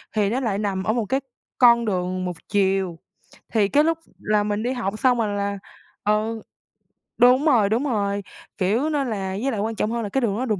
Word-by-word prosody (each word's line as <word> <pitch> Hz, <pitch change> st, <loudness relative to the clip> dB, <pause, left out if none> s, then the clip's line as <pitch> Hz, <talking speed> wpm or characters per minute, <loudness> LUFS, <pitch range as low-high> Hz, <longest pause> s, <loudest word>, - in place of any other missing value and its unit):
thì 205 Hz, -2 st, +2 dB
nó 240 Hz, +5 st, 0 dB
lại 225 Hz, -7 st, -1 dB
nằm 200 Hz, -2 st, -2 dB
ở 215 Hz, -, +1 dB
một 235 Hz, -2 st, -1 dB
cái 265 Hz, +7 st, 0 dB, 0.4 s
con 235 Hz, -2 st, +6 dB
đường 185 Hz, -2 st, -1 dB
1 180 Hz, -2 st, -4 dB
chiều, 190 Hz, -3 st, +1 dB, 0.6 s
thì 215 Hz, -3 st, +3 dB
cái 290 Hz, +8 st, +3 dB
lúc 325 Hz, +1 st, +1 dB, 0.2 s
là 210 Hz, 0 st, +1 dB
mình 205 Hz, +1 st, -2 dB
đi 245 Hz, -, 0 dB
học 215 Hz, -4 st, -3 dB
xong 255 Hz, -2 st, +3 dB
rồi 210 Hz, -3 st, 0 dB
là, 200 Hz, 0 st, -2 dB, 0.5 s
ừ 215 Hz, +2 st, 0 dB, 0.8 s
đúng 250 Hz, +4 st, +5 dB
rồi, 235 Hz, -10 st, +4 dB
đúng 225 Hz, +5 st, +1 dB
rồi, 205 Hz, -6 st, -1 dB, 0.3 s
kiểu, 220 Hz, +11 st, +1 dB
nên 290 Hz, -3 st, 0 dB
là 190 Hz, -3 st, -3 dB
với 270 Hz, +2 st, 0 dB
lại 220 Hz, -, -3 dB
quan 220 Hz, +2 st, -2 dB
trọng 215 Hz, +1 st, -1 dB
hơn 235 Hz, 0 st, -2 dB
là 205 Hz, -, -4 dB
cái 265 Hz, +7 st, 0 dB
đường 210 Hz, -4 st, 0 dB
đó 255 Hz, -, -1 dB
đường 215 Hz, -6 st, -1 dB
215 Hz, 220 wpm, -23 LUFS, 200-245 Hz, 0.8 s, con